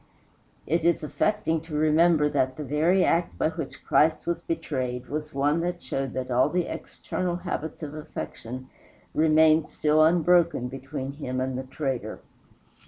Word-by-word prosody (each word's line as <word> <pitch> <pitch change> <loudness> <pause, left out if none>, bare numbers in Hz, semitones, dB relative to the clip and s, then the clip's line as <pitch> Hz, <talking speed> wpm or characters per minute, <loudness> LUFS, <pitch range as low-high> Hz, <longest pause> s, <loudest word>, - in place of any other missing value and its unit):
It 165 +2 0
is 170 -1 +2
affecting 165 0 0
to 160 -1 -8
remember 155 0 +4
that 130 -3 0
the 150 - -4
very 160 +7 +2
act 170 +1 +1
by - - +2
which 160 -3 -7
Christ 155 +1 +3
was 170 0 -1
betrayed 130 -6 -3
was 150 +1 -4
one 145 +4 +1
that 175 +1 -2
showed 135 -5 -3
that 130 0 -4
all 125 +4 +3
the 180 +1 0
external 180 -1 -4
habits 175 -3 -5
of 145 -1 -5
affection 130 -4 -7 0.5
remained 155 0 +4
still 155 +1 +3
unbroken 170 -5 +3
between 135 +1 -5
him 130 -3 -4
and 130 0 -2
the 130 - -2
traitor. 130 -5 -3
155 Hz, 155 wpm, -26 LUFS, 135-165 Hz, 0.5 s, remember